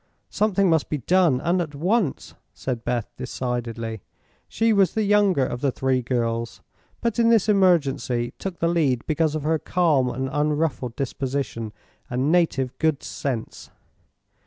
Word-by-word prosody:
"Something 200 -2 +2
must 160 -3 +2
be 150 - -1
done, 165 -1 +3
and 175 +2 +1
at 150 -4 -5
once," 180 - 0 0.2
said 125 -3 -4
Beth, 120 -2 -1
decidedly. 120 -4 -4 0.5
She 225 0 +1
was 195 -3 +3
the 220 - +1
younger 200 -8 +3
of 120 0 -4
the 140 - +1
three 130 0 0
girls, 115 -1 -2 0.4
but 235 0 -1
in 230 0 +4
this 225 -4 +4
emergency 145 - +2
took 190 -3 -5
the 165 - 0
lead 150 -8 +1
because 155 -1 +1
of 155 - -3
her 160 +1 +1
calm 155 -9 +2
and 130 +2 -3
unruffled 150 -4 -1
disposition 135 -4 -3 0.4
and 130 +5 0
native 140 -7 +1
good 160 -3 +1
sense. 125 -5 -5
145 Hz, 150 wpm, -24 LUFS, 125-175 Hz, 0.5 s, in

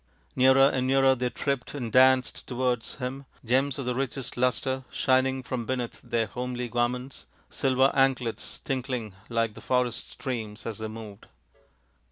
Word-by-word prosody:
Nearer 130 +1 +6
and 130 -2 0
nearer 135 0 +5
they 125 -1 -1
tripped 140 +1 -3
and 120 -5 -4
danced 130 +1 +4
towards 125 -2 -1
him, 135 +1 -5 0.2
gems 130 +3 +2
of 135 - -4
the 125 - 0
richest 135 0 -3
lustre 130 +1 0
shining 130 0 +2
from 120 -2 -4
beneath 125 -2 -3
their 120 -2 0
homely 125 +3 -4
garments, 120 - -2 0.2
silver 130 0 +3
anklets 130 -4 0
tink 135 -1 -2
ling 115 -6 -3 0.2
like 115 -2 0
the 110 - -11
forest 125 0 0
streams 115 -4 -5
as 110 -2 -4
they 110 - -3
moved. 110 -2 -9
125 Hz, 155 wpm, -27 LUFS, 120-130 Hz, 0.2 s, Nearer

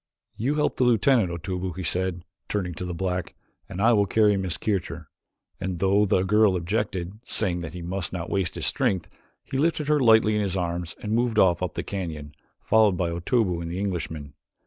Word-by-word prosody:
"You 135 +7 -1
help 150 - 0
the - - +2
lieutenant, 120 -3 +3
Otobu," 90 +2 -4
he 95 - -5
said, 90 +1 0 0.2
turning 90 -4 -2
to 90 - -6
the 90 - -4
black, 90 -1 -3 0.3
"and 90 - -6
I 115 +3 +5
will 100 -2 +3
carry 105 +1 +4
Miss 95 -4 -2
Kircher," 100 -6 -3 0.5
and 95 -1 -3
though 100 +3 +3
the 95 -1 +2
girl 105 0 +4
objected, 90 +1 -2
saying 95 -8 -1
that 80 -3 -6
he 90 - -6
must 90 +1 -3
not 85 -2 -4
waste 95 -4 -1
his - - -3
strength, 90 -4 0 0.3
he 135 - -3
lifted 150 -1 +1
her 150 -1 +4
lightly 110 -3 +5
in 105 - +1
his 95 -2 -1
arms 85 -1 -3
and 105 - -3
moved 120 -1 +1
off 90 -4 +4
up 90 - -3
the - - -2
canyon, 80 -7 -5 0.3
followed 110 -4 +4
by 85 -1 0
Otobu 90 +1 0
and 85 - -5
the 85 - -4
Englishman. 80 -7 -4
95 Hz, 200 wpm, -25 LUFS, 85-110 Hz, 0.5 s, I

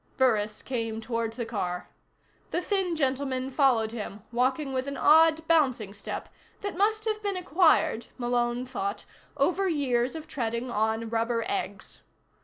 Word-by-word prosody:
Burris 215 -5 +2
came 225 -3 -3
toward 230 0 -2
the 235 0 -4
car. 180 -6 -3 0.6
The - - 0
thin 375 -2 0
gentleman 265 -2 -1
followed 250 -6 +3
him, 210 -3 -6
walking 265 +3 0
with 260 +1 -1
an 280 - -4
odd 320 +1 +5
bouncing 255 -11 +2
step 200 - -6 0.3
that 405 -3 -4
must 430 +3 +1
have 430 -1 -1
been 400 -2 -1
acquired, 320 -7 +3
Malone 240 0 0
thought, 390 +10 -4 0.3
over 360 +7 +2
years 260 -4 +1
of 315 -1 -7
treading 240 -3 -3
on 220 +1 0
rubber 230 +1 0
eggs. 200 -1 -4
255 Hz, 145 wpm, -28 LUFS, 230-320 Hz, 0.6 s, odd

